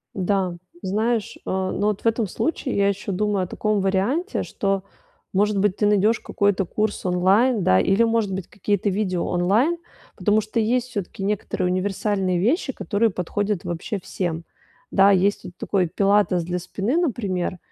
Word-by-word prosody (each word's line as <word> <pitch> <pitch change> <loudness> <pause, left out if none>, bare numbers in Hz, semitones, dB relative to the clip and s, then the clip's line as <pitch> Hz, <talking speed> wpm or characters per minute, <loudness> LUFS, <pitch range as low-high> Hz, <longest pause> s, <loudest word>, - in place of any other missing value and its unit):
Да, 190 -1 0 0.3
знаешь, 215 +3 -1
э, - - -24
но 190 +2 -1
вот 210 -2 -1
в - - -24
этом 225 -1 +2
случае 265 - -2
я 200 0 +3
ещё 200 0 -3
думаю 205 0 0
о - - -4
таком 215 +3 0
варианте, 200 - 0
что, 195 -1 -1 0.5
может 205 +2 +2
быть, 195 0 +1
ты 210 - +1
найдёшь 210 +2 +3
какой-то 200 -2 0
курс 210 +3 -2
онлайн, 195 +6 +3
да, 95 - +4
или, 195 - +3
может 225 -3 +1
быть, 190 -1 -4
какие-то 205 0 -1
видео 185 -3 -1
онлайн, 210 - +2 0.4
потому 210 0 +2
что 215 +2 -3
есть 245 +3 +1
всё-таки 200 -3 -5
некоторые 195 -2 -1
универсальные 190 0 0
вещи, 265 - +1
которые 225 0 +1
подходят 200 +1 -2
вообще 175 +5 -3
всем. 175 -3 -3 0.5
Да, 195 +1 +6
есть 195 +1 +2
вот 180 - -8
такой 185 -3 0
пилатес 195 0 +2
для 180 +2 -2
спины, 195 - -2
например, 200 - -1
200 Hz, 165 wpm, -23 LUFS, 185-215 Hz, 0.5 s, Да